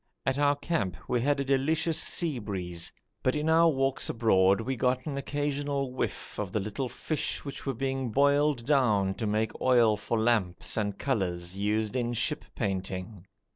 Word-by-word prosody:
At 135 +1 +1
our 145 0 +4
camp 105 - -2
we 125 -1 +1
had 145 +2 +2
a 140 - -1
delicious 155 +4 +1
sea 160 -7 -1
breeze, 90 -5 -4 0.3
but 130 - +1
in 150 +1 -1
our 165 +1 +6
walks 135 -2 0
abroad 100 -4 +4
we 130 +4 -2
got 125 +1 0
an 145 - -3
occasional 140 -1 -2
whiff 130 - -4
of 100 -3 -3
the 105 - 0
little 110 +6 -3
fish 155 +3 -3
which 140 0 -7
were 135 - -1
being 135 0 -2
boiled 140 0 +3
down 110 -9 +3
to 110 +2 -3
make 110 +1 -1
oil 120 -4 +5
for 105 +2 -2
lamps 110 -6 +1
and 105 -3 -1
colours 90 -8 -1
used 105 +3 0
in 120 -1 0
ship 150 +6 -1
painting. 95 -2 -3
120 Hz, 175 wpm, -29 LUFS, 105-140 Hz, 0.3 s, our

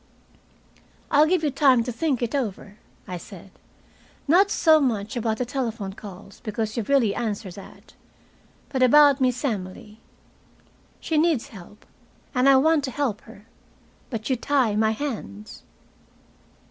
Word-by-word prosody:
"I'll 295 +2 +5
give 355 -1 +1
you 295 - +1
time 265 -4 +4
to 245 - -4
think 265 0 -1
it 240 - -3
over," 210 -5 -4 0.3
I 180 -2 -5
said. 195 +1 -13 0.8
"Not 375 +7 +5
so 320 -6 +4
much 220 -6 -1
about 225 -2 -1
the 250 - -2
telephone 230 -6 -4
calls, 195 -1 -12
because 215 0 -4
you've 230 -4 -4
really 255 -8 +3
answered 210 -5 -4
that. 195 - -14 0.8
But 265 -2 -2
about 285 +1 +6
Miss 250 +1 0
Emily. 210 -1 -5 1.0
She 315 -2 0
needs 315 -6 +1
help, 205 0 -14 0.5
and 255 +1 +3
I 275 - +7
want 305 +2 +3
to - - -4
help 250 -6 -2
her. 210 -2 -15 0.6
But 225 -4 -5
you 260 - +1
tie 250 -3 +1
my 220 +1 +2
hands." 215 - -6
240 Hz, 145 wpm, -24 LUFS, 210-280 Hz, 1.0 s, I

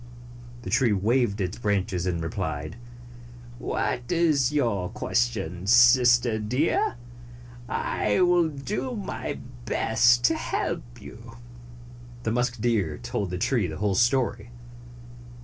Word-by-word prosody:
The - - -6
tree 120 -5 +3
waved 110 +1 +1
its 95 +3 -3
branches 95 -4 -1
and 85 -2 -2
replied, 80 -2 -4 0.8
"What 120 0 -2
is 155 -6 +2
your 115 -11 0
question, 100 -6 -2
Sister 120 0 +5
Deer? 125 +6 0 0.7
I 105 - -1
will 175 -2 +3
do 205 - -4
my 205 -3 -5 0.3
best 120 +2 +3
to 125 - +4
help - - -4
you." 115 +1 -12 0.9
The 110 - -1
musk 120 0 -1
deer 105 -10 0
told 90 +11 -4
the 90 - -4
tree 110 0 0
the 80 -1 -6
whole 105 -1 0
story. 120 0 +1
115 Hz, 115 wpm, -25 LUFS, 95-125 Hz, 0.9 s, Sister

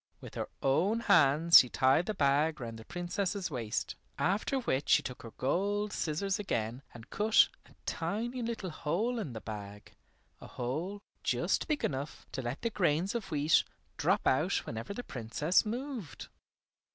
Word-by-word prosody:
With - - -11
her - - -4
own 185 +12 +2
hands 160 -1 +7
she 125 - +2
tied 135 +8 +3
the 215 - -2
bag 150 +1 +2
round 115 -2 -6
the 110 - -11
Princess's 175 +1 -2
waist, 115 -5 -3 0.2
after 200 +9 +1
which 145 - -1
she - - +5
took 125 - -6
her 115 - -8
gold 200 +9 0
scissors 190 +6 -1
again 115 - -2
and 115 -2 -13
cut 215 +1 +4 0.2
a - - -21
tiny 225 +9 -2
little 225 -6 -3
hole 185 +11 -1
in 150 - -4
the 110 - -6
bag, 105 -1 -8 0.5
a - - -11
hole 165 +12 -4 0.2
just - - 0
big 305 -3 0
enough 140 +1 -4
to 135 - -3
let 120 +3 -5
the 230 - 0
grains 180 -1 +1
of 230 -5 -4
wheat 150 -1 +3 0.3
drop - - +1
out - - +2
whenever 110 - -5
the 245 +5 -5
Princess 150 - 0
moved. 240 - -5
165 Hz, 165 wpm, -32 LUFS, 130-205 Hz, 0.5 s, hands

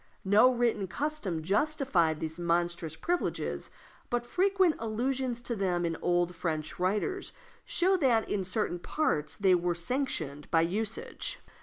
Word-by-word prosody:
No 210 +6 +6
written 235 -5 +1
custom 205 - -2
justified 200 - +1
these 160 +1 -4
monstrous 170 -2 0
privileges, 350 - -2 0.4
but 240 0 -1
frequent 375 +3 +3
allusions 245 +2 -1
to 235 0 -3
them 180 -4 0
in 165 - 0
the - - -7
old 175 0 +1
French 155 -2 -3
writers 210 - -1 0.3
show 370 +2 +2
that 245 -9 +3
in 195 - -1
certain 185 -1 -1
parts 160 - -1
they 190 0 +4
were 175 -1 +1
sanctioned 170 - -3
by 165 -1 +4
usage. 220 - -3
200 Hz, 140 wpm, -30 LUFS, 170-260 Hz, 0.4 s, No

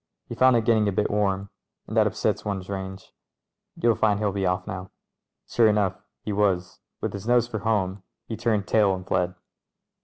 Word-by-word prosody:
"He - - -7
found 130 -1 +5
it 115 -2 +2
get 115 - +5
ting 110 -2 +2
a - - +2
bit 105 +2 0
warm, 100 -1 0 0.3
and - - -7
that - - +5
upsets - - -1
one's 95 -2 -4
range. 95 0 -6 0.7
Vou'II 115 -1 +3
find 105 -2 +2
he'll 105 -2 +1
be 95 -1 -1
off 90 0 0
now." 90 +1 -6 0.6
Sure 115 -2 +4
enough 105 -3 +1 0.2
he 105 - -3
was 95 -3 0
— - - -57
with - - -2
his 100 +2 -6
nose 120 -1 +4
for 110 -3 -4
home 100 -3 0 0.2
he 115 - -5
turned 110 -3 0
tail 105 -3 +3
and 95 0 -8
fled. 90 0 0
100 Hz, 205 wpm, -25 LUFS, 95-110 Hz, 0.7 s, found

